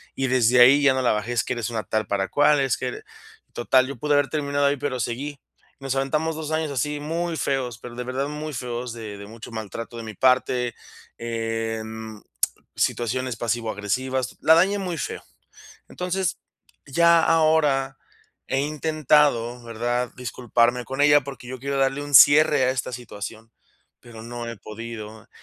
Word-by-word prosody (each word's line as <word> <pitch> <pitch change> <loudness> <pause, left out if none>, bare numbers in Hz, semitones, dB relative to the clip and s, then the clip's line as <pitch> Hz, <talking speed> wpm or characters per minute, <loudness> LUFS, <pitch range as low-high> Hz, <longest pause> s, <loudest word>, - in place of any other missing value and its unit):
y 135 - -1
desde 125 -1 +4
ahí 135 +4 +7
ya 140 -2 +5
no 130 - 0
la - - +3
bajé: 110 +3 -2
"Es 120 - +1
que 130 - -2
eres 120 -1 -3
una 110 -3 -3
tal 110 +3 -2
para 95 -1 0
cual, 145 0 +4
es 135 -2 +1
que - - -3
eres". 430 +1 -6 0.5
Total, 130 +2 +3
yo 140 - -6
pude 150 +4 0
haber 145 -1 +2
terminado 145 -2 0
ahí, 140 0 +2
pero 130 -2 -3
seguí. 135 +5 -4 0.4
Nos 135 0 -2
aventamos 150 +4 0
2 155 -1 -5
años 155 -2 -1
así 145 +3 -2
muy 165 +2 -3
feos, 125 -5 -2
pero 120 -1 -10
de 125 - -4
verdad 130 +3 -2
muy 150 +1 -5
feos 125 -1 -4
de 110 -3 -7
de 100 0 -10
mucho 115 +2 -10
maltrato 110 +2 -6
de 115 - -6
mi 110 -1 -7
parte, 125 -1 +2 0.4
em, 110 -1 -4 0.5
situaciones 125 0 -1
pasivo 115 -1 -1
agresivas. 130 +5 -2
La 160 - +6
dañé 195 +4 +3
muy 180 -4 -3
feo. - - -5 0.7
Entonces, 180 0 -2 0.5
ya 170 +3 +4
ahora 150 -5 +2 0.5
he 135 - +1
intentado, 150 -5 +1
¿verdad?, 120 +2 -2
disculparme 120 0 0
con 135 +1 -5
ella, 145 0 +6
porque 135 -2 -9
yo 130 0 -6
quiero 140 0 -2
darle 135 +1 +1
un 145 0 -6
cierre 145 0 +7
a 125 - +3
esta 130 -1 -3
situación, 115 -1 -8 0.5
pero 115 -2 -12
no 120 0 -6
he 115 - -6
podido. 110 -1 -9
130 Hz, 175 wpm, -24 LUFS, 115-145 Hz, 0.7 s, ahí